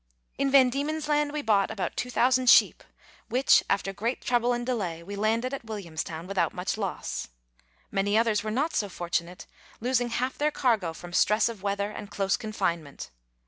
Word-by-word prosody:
In 275 0 +2
VanDiemen's 280 +4 +3
Land 295 -1 +1
we 300 0 -3
bought 205 -4 +2
about 215 -4 -3
2,000 250 0 +2
sheep, - - +6 0.5
which, 255 +4 +4
after 195 0 0
great 230 +6 -2
trouble 240 0 +1
and 240 0 -1
delay, 185 -10 -2
we 200 +4 -7
landed 225 +5 0
at 275 - -5
Williamstown 170 -6 -5
without 195 0 -1
much 180 +2 -2
loss. 200 -4 -4 0.6
Many 205 +1 +1
others 220 -3 +2
were 215 - -3
not 285 +9 0
so 205 - 0
fortunate, 175 0 -3 0.3
losing 245 +1 0
half 255 +2 -2
their 300 +1 +2
cargo 225 - 0
from 175 +1 -10
stress 210 +6 +3
of 225 -5 -8
weather 200 +1 -1
and 210 -1 -8
close 195 0 0
confinement. 170 - -3
215 Hz, 170 wpm, -27 LUFS, 195-250 Hz, 0.6 s, sheep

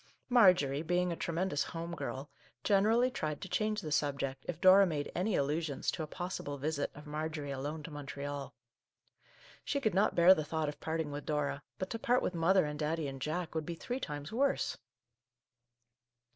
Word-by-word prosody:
Marjorie, 180 - +5
being 180 +2 +1
a - - -1
tremendous 170 -2 -1
home 170 +1 -5
girl, 135 -2 -5 0.4
generally 220 +5 +4
tried 155 - -3
to 195 - -6
change 215 +2 0
the 155 - -5
subject 140 -2 -1
if 170 -2 -4
Dora 190 +2 +7
made 150 -4 -2
any 185 +3 0
allusions 150 +1 0
to - - -5
a 155 - -3
possible 175 -4 -4
visit 145 +1 -1
of 145 +1 -11
Mar 155 +1 -3
jorie 145 -3 -4
alone 150 +3 -4
to 160 - -8
Montreal. 145 -1 -5 1.1
She 280 - -1
could 220 -8 +1
not 200 +3 +3
bear 175 +2 +8
the 155 - -1
thought 155 0 -1
of 145 - -8
parting 160 -2 -2
with 145 0 -6
Dora, 150 -2 -1 0.2
but 185 - -4
to 230 - -3
part 245 +2 +2
with - - -1
mother 175 +2 +4
and 150 0 -4
Daddy 155 0 -1
and 135 -1 -7
Jack 160 +4 -2
would 160 -1 -1
be 170 +2 -5
three 250 +9 -4
times 145 - -5
worse 230 - +1
160 Hz, 185 wpm, -33 LUFS, 145-185 Hz, 1.1 s, bear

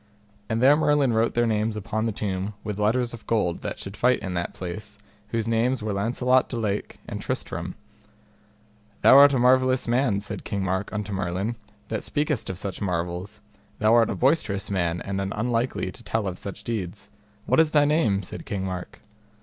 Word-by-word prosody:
And 115 +2 0
there 140 +3 +7
Merlin 145 -4 +3
wrote 110 +1 +1
their 120 0 +3
names 110 -1 0
upon 110 +2 -2
the - - 0
tomb 100 -1 -3
with 105 -1 -4
letters 120 +3 +1
of 115 - -11
gold 100 -7 0
that - - -4
should 100 +1 -8
fight 125 +3 +3
in 95 -3 -4
that 85 0 -3
place, 105 +4 -7 0.3
whose 115 0 -2
names 115 +2 +1
were 105 -1 -1
Launcelot 125 +5 +2
de 120 - -4
Lake, 105 -3 -2
and - - -5
Tristram. - - -4 1.3
Thou - - +8
art 140 +1 +9
a 135 - +1
marvellous 130 +1 +3
man, 120 -4 +2
said 100 - -6
King 100 -1 -2
Mark 95 +1 -1
unto 105 -1 -3
Merlin, 95 +4 -2 0.3
that 110 -2 -2
speakest 145 -8 -1
of 95 - -4
such 95 -1 -4
marvels, 90 +2 -3 0.4
thou 110 +1 +3
art 115 -1 +5
a - - -1
boistous 120 -9 +1
man 85 -3 0
and 95 0 -2
an 95 0 -3
unlikely 120 +3 -1
to - - -15
tell 110 -2 -1
of 90 -1 -4
such 100 - -7
deeds. 105 -2 -5 0.3
What - - +3
is 160 -1 +5
thy 150 -1 +4
name? 120 -10 +2
said - - -7
King 95 -2 -3
Mark. 90 -1 -6
110 Hz, 190 wpm, -25 LUFS, 100-120 Hz, 1.3 s, art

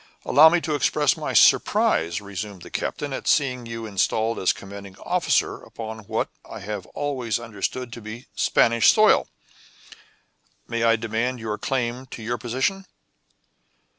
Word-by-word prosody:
"Allow 155 +4 +7
me 175 +2 +2
to 155 - -2
express 145 0 +2
my - - -4
surprise," 85 +4 +4
resumed 100 -2 -7
the - - -12
captain, 145 -2 -3
"at - - -5
seeing 125 -5 +1
you 115 0 -6
installed 110 +2 0
as 95 - +3
commanding 100 -1 -10
officer - - +1
upon 110 -1 -8
what - - -2
I - - -9
have 100 -2 -5
always 130 -7 -2
understood 120 +2 -4
to 120 - -8
be 110 +4 -8
Spanish 115 -1 +4
soil. - - +4 1.4
May 115 0 -2
I 115 0 +4
demand 115 +3 -2
your 110 -1 -4
claim 125 0 -2
to 115 - -9
your 120 +2 -2
position?" 130 - -2
115 Hz, 145 wpm, -24 LUFS, 105-130 Hz, 1.4 s, Allow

